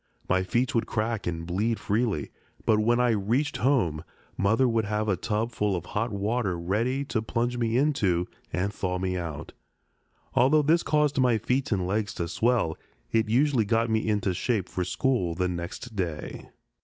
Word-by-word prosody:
My 95 - +2
feet 120 +7 0
would 115 - +1
crack 110 -2 -2
and 85 -1 -3
bleed 105 +6 0
freely, 105 - -1 0.3
but 110 -1 +4
when 120 +3 +3
I 125 -1 +3
reached 115 +8 0
home 105 - +1 0.3
Mother 110 +6 +3
would 115 -2 +1
have 105 +1 -1
a 100 - +2
tub 110 +5 -2
full 105 -3 0
of 90 -1 -4
hot 115 +6 -2
water 100 -1 -1
ready 115 +11 -1
to 115 -5 -1
plunge 120 +2 -1
me 115 0 +1
into 100 - +2 0.2
and 95 +5 -1
thaw 90 -2 -2
me 90 0 -1
out. 80 -5 -5 0.8
Although 145 +5 +4
this 165 +4 +4
caused 150 -2 +1
my 125 -3 +4
feet 130 +6 -1
and 95 -4 +1
legs 100 +2 -1
to 85 - -2
swell, 110 -5 +1 0.3
it 110 -1 +2
usually 130 0 +3
got 115 +2 +1
me 110 0 +1
into 105 -3 +1
shape 100 0 -1
for 90 - -2
school 90 -4 0
the 90 +1 0
next 90 +6 -5
day. 85 -6 -4
110 Hz, 180 wpm, -27 LUFS, 95-120 Hz, 0.8 s, but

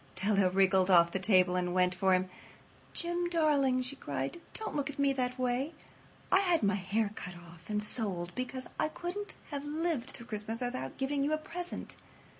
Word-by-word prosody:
Della 195 0 +3
wriggled 190 0 +3
off 170 -2 +6
the 190 - -1
table 185 -2 +5
and 180 0 0
went 180 0 +3
for 190 0 +3
him. 185 0 0 0.6
"Jim, 345 0 0
darling," 285 -6 +3
she 255 +2 -2
cried, 140 - -4
"don't 435 -7 -4
look 285 -1 0
at 285 - -7
me 280 -1 +3
that 255 -1 -1
way. 255 +4 0 0.6
I 380 - +6
had 355 - +2
my 200 0 +3
hair 205 +2 0
cut 180 -4 -7
off 170 0 -14
and 210 0 0
sold 190 -6 -1
because 255 +1 -4
I - - +3
couldn't 355 +6 -5 0.2
have 285 -1 -3
lived 300 -3 -1
through 235 - -10
Christmas 220 0 -3
without 250 +1 -3
giving 275 +1 0
you 295 +2 +1
a - - +2
present. 355 +3 -6
245 Hz, 190 wpm, -32 LUFS, 185-290 Hz, 0.6 s, off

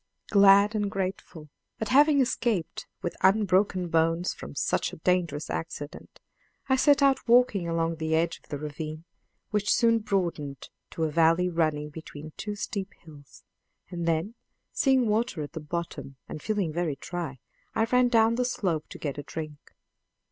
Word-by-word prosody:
Glad 200 +1 +6
and 205 -2 0
grateful 185 -5 -5 0.3
at 220 - -3
having 285 +2 +5
escaped 235 -8 -1 0.2
with 175 - -3
unbroken 190 -2 +3
bones 165 +2 +1
from 70 - -10
such - - 0
a - - -8
dangerous 170 -3 0
accident, 145 -2 -6 0.5
I 265 - +3
set 285 +1 +4
out 275 -2 +3
walking 235 -7 +4
along 165 0 -1
the 160 0 0
edge 165 +1 0
of - - -28
the 145 - -3
ravine, 155 +2 -6 0.5
which 210 -1 +1
soon 230 -1 +4
broadened 170 -9 -3 0.2
to 165 - -4
a 155 - 0
valley 165 +3 +3
running 155 -3 -1
between 155 -1 -9
two 210 -1 -5
steep 200 -1 -4
hills; 145 -4 -16 0.5
and 170 -1 -3
then, 165 +6 0 0.4
seeing 265 -3 +3
water 215 -6 0
at 145 - -8
the 160 - -5
bottom 155 -3 -5
and 155 - -7
feeling 200 -7 -1
very 170 -3 -1
dry, 160 -1 -5 0.4
I 220 - +2
ran 250 +1 +3
down 230 -1 +4
the 250 - +2
slope 180 -10 -2
to - - -9
get 145 -1 -4
a - - -6
drink. 155 -2 -8
175 Hz, 160 wpm, -27 LUFS, 155-215 Hz, 0.5 s, Glad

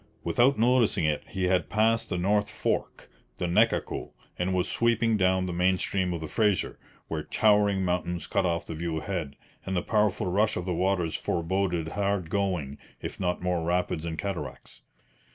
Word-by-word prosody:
Without 130 +3 +3
noticing 115 -6 +3
it, 75 -1 +1
he 95 -1 -4
had 90 0 +1
passed 115 +1 +2
the 90 - -1
north 105 +3 +1
fork, - - -2 0.3
the - - -2
Nechaco, 105 +7 +1 0.2
and 90 +1 -1
was 90 -1 +1
sweeping 115 -1 +2
down 95 -2 +2
the 90 - -3
main 90 +2 +2
stream 95 -1 -1
of 85 -2 -3
the 80 - -4
Fraser, 105 +1 0 0.3
where - - -3
towering 105 -3 +3
mountains 90 -1 -1
cut 100 - 0
off 85 -2 0
the - - -6
view 80 0 -3
ahead, 80 -3 -4 0.3
and 95 -1 -2
the 90 - 0
powerful 105 -2 +1
rush 105 +4 +1
of 90 - -3
the 90 - -1
waters 90 -2 0
foreboded 85 -1 -1
hard 100 -3 -1
going, 90 -9 -1 0.2
if - - -6
not 90 -1 -1
more 90 -2 0
rapids 85 -2 0
and 80 -1 -4
cataracts. 100 +2 -6
95 Hz, 175 wpm, -27 LUFS, 85-105 Hz, 0.3 s, Without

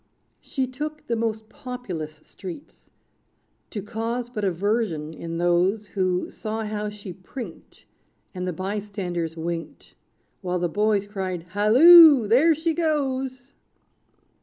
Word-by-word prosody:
She 265 -2 -2
took 300 +4 -6
the 235 - -1
most 220 -1 -2
populous 215 - -7
streets. 190 +8 -11 0.8
To 205 -4 -5
cause 230 +3 -3
but 215 -4 -5
aversion 190 -4 -1
in 165 +1 -6
those, 175 +5 +2
Who 185 -2 -1
saw 220 +1 -4
how 210 0 -3
she 205 -3 -9
prinked, 195 0 -10 0.5
And 180 -1 -4
the - - 0
bystanders 185 -3 -4
winked. 165 0 -6 0.5
While 180 -2 -1
the 175 -1 -1
boys 205 +2 +1
cried, 190 -4 -4
"Halloo! 260 - +8
there 290 +9 +5
she 325 +2 -1
goes!" 270 -5 -2
210 Hz, 120 wpm, -24 LUFS, 180-250 Hz, 0.8 s, Halloo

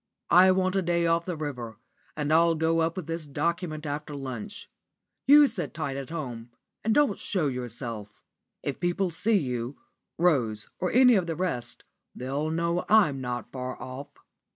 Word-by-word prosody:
I 185 +2 +8
want 185 0 +2
a 195 - +3
day 170 -1 +1
off 165 0 +2
the 180 -3 -3
river, 125 -8 -5 0.4
and 150 0 0
I'll 165 +1 +5
go 160 +1 +1
up 165 +1 +1
with 185 - -4
this 165 -1 -4
document 155 +2 -2
after 150 0 -4
lunch. 140 +10 -6 0.6
You 295 +1 +9
sit 195 - -3
tight 135 - -3
at 135 -1 -5
home 125 -8 -6 0.3
and 225 - +1
don't 290 -9 +3
show 185 -6 -1
yourself. 120 -5 -4 0.5
If 140 - -3
people 175 +1 0
see 210 +6 +2
you 125 -4 -3 0.4
Rose 120 -11 +1
or 180 - -1
any 250 +1 +6
of 190 -5 +2
the 165 - -2
rest 125 -10 -3 0.3
they'll 140 +5 -2
know 170 +2 0
I'm 180 -11 +4
not 125 -1 -4
far 130 -1 -5
off." 130 +3 -7
160 Hz, 170 wpm, -27 LUFS, 130-180 Hz, 0.6 s, You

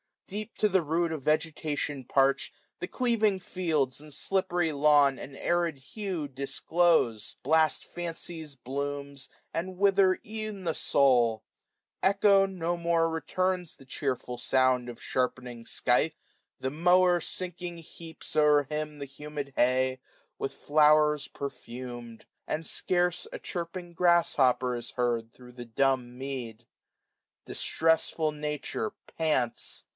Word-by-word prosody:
Deep 215 +3 -6
to 210 - +3
die 190 -1 +4
root 165 +1 0
Of 155 -4 -4
vegeudon 150 -3 -1
parch'd, 135 0 +2 0.3
the - - -3
cleaving 225 -5 +1
fields 160 -8 -1
440 145 - -8
And 150 - -10
slippery 175 0 0
lawn 145 -2 +4
an 135 - -8
arid 170 -2 0
hue 175 +3 -5
disclose; 140 -3 +1
Blast 155 +2 +3
Fancy's 165 -3 -5
blooms, 140 +1 -5 0.3
and 185 +2 -3
wither 195 -1 +4
ev'n 215 -2 -4
the 165 -2 0
SouL 120 -8 +3 0.6
Echo 195 0 +5
no 175 -3 -2
more 170 -1 +2
returns 180 +2 -1
the 135 - -16
chearfiil 130 -2 -3
sound 130 -1 +2
Of 120 - -9
sharpening 125 -2 -2
scythe: 150 +8 +2 0.5
the 130 - -1
mower 180 +3 +4
sinking 175 0 -5
heaps 165 0 -10
O'er 150 -1 +5
him 150 +1 -4
the 140 - -4
humid 145 0 -7
hay, 130 +1 +2 0.4
with - - -3
flowers 150 0 +4
perfumM; 120 -4 -7
445 - - -22 0.2
And 160 +2 -2
scarce 180 +1 0
a - - -3
chirping 175 0 -6
grass 175 0 +3
hopper 125 -2 +3
is 120 0 -7
heard 120 -2 -1
Thro' 125 -1 -14
the 120 0 -9
dumb 125 0 0
mead. 125 -4 -6 0.8
Distressful 160 -1 +1
Nature 150 -7 -3 0.2
pants. 150 -7 0
150 Hz, 130 wpm, -29 LUFS, 130-175 Hz, 0.8 s, Echo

